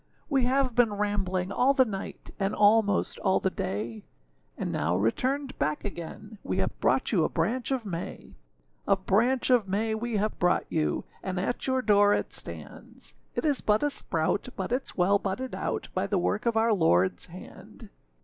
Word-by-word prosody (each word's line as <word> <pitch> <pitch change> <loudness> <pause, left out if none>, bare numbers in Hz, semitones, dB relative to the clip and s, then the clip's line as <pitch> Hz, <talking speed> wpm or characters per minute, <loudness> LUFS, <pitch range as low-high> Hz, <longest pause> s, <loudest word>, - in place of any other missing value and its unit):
We 270 -3 +3
have 260 0 +1
been 235 -3 +3
rambling 195 -3 -1
all 260 +7 +3
the 260 -2 +5
night, 195 -4 -7
And 195 +1 0
almost 210 0 +3
all 190 -1 +2
the 190 - 0
day; 110 - -4 0.5
And - - -3
now 80 +4 0
returned 260 - 0
back 150 +5 -1
again, 205 +3 -7
We - - -2
have - - -2
brought - - +1
you 180 -8 +3
a - - +1
branch 225 +10 -1
of 260 -4 -1
May. 175 -4 -6 0.5
A 200 - +5
branch 230 +8 +1
of 240 -5 +4
May 215 +3 0
we 230 +1 -3
have 210 +1 -1
brought 180 +1 +2
you, 155 -1 0 0.2
And 185 -1 -3
at 200 +8 -2
your 260 -1 +1
door 205 -1 +5
it - - -3
stands; - - -10 0.2
It - - -1
is 290 -3 +2
but 210 +3 +2
a 290 - +2
sprout, 165 -2 -1
But 190 0 -4
itâs 255 +2 -2
well 195 +3 +4
budded 215 +8 -3
out - - -3
By - - -1
the 200 - 0
work 210 +5 0
of 230 -1 +2
our 225 +1 +3
Lordâs 95 - +2
hand. 190 +5 -12
205 Hz, 185 wpm, -28 LUFS, 185-240 Hz, 0.5 s, the